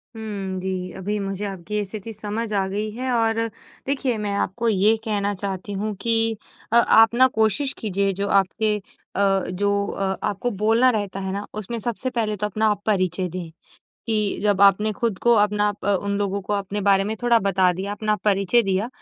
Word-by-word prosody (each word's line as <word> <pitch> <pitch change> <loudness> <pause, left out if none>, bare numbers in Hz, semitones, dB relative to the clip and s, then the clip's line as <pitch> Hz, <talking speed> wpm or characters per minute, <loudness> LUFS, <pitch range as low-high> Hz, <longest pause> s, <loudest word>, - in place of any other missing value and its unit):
हुँ, 200 -4 -5
जी। 185 -1 -4
अभी 205 +3 -3
मुझे 195 0 -4
आपकी 200 +2 -3
स्थिति 215 +3 -7
समझ 215 +2 -4
आ 195 -2 +1
गई 205 +3 -3
है। 255 +4 -3
और 225 -1 +1 0.5
देखिए 270 -4 0
मैं 210 -1 -2
आपको 230 +4 -1
ये 210 +1 +3
कहना 205 -2 0
चाहती 195 0 -5
हूँ 215 0 -2
कि 225 -1 +2 0.4
अ, - - +5
आप 225 -1 +7
न 260 +2 +6
कोशिश 220 +6 +1
कीजिए 200 -2 0
जो 200 - 0
आपके 200 +2 +2
अ, 195 -1 -2
जो 200 +2 0
अ, 190 -1 -2
आपको 205 +5 -2
बोलना 230 +4 +4
रहता 205 -5 -2
है 190 -1 -4
न - - -8
उसमें 230 +3 -4
सबसे 240 +3 -3
पहले 225 -4 -1
तो 210 - -1
अपना 215 +2 0
आप 205 -1 -1
परिचय 185 -3 0
दें। 175 -1 -6 0.6
कि 215 -3 +1
जब 205 -2 +2
आपने 200 +2 +5
ख़ुद 225 -2 -2
को 240 - +5
अपना 210 0 +2 0.2
अ, 205 - +3
उन 200 0 -1
लोगों 200 0 -1
को 210 - -4
अपने 200 0 -2
बारे 195 0 +4
में 215 +2 -3
थोड़ा 240 -1 +5
बता 190 -3 +2
दिया, 190 +3 -4
अपना 215 +1 -1
परिचय 200 +3 +3
दिया 195 +2 -1
205 Hz, 190 wpm, -22 LUFS, 195-220 Hz, 0.6 s, आप